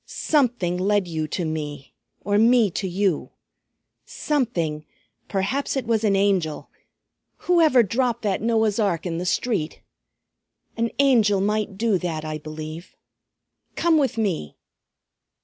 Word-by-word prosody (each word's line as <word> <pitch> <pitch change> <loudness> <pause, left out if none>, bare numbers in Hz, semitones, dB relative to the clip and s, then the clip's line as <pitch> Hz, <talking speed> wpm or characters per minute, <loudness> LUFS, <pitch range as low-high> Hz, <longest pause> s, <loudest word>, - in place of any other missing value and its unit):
Something 240 - 0
led 200 0 +1
you 160 -2 -3
to 175 +3 -3
me, 150 -3 -5 0.3
or 205 +1 +1
me 230 -2 +4
to 190 - -3
you; 185 -2 -1 0.7
something, 175 - -2 0.4
perhaps 215 +9 -1
it 260 - -2
was 225 -1 0
an 205 -2 +3
Angel, 190 -6 0 0.7
whoever 320 -8 +5
dropped 235 +3 -1
that 200 -3 0
Noah's 220 -1 +1
ark 195 -6 0
in 165 -2 -2
the 180 - -3
street. 190 -6 -1 1.0
An 230 0 0
Angel 230 -8 +4
might 210 0 -1
do 215 -3 +1
that, 160 -3 -4
I 155 0 -4
believe. 155 +2 -8 0.8
Come 335 -2 +3
with 270 -5 0
me." 185 - -2
200 Hz, 130 wpm, -23 LUFS, 170-230 Hz, 1.0 s, whoever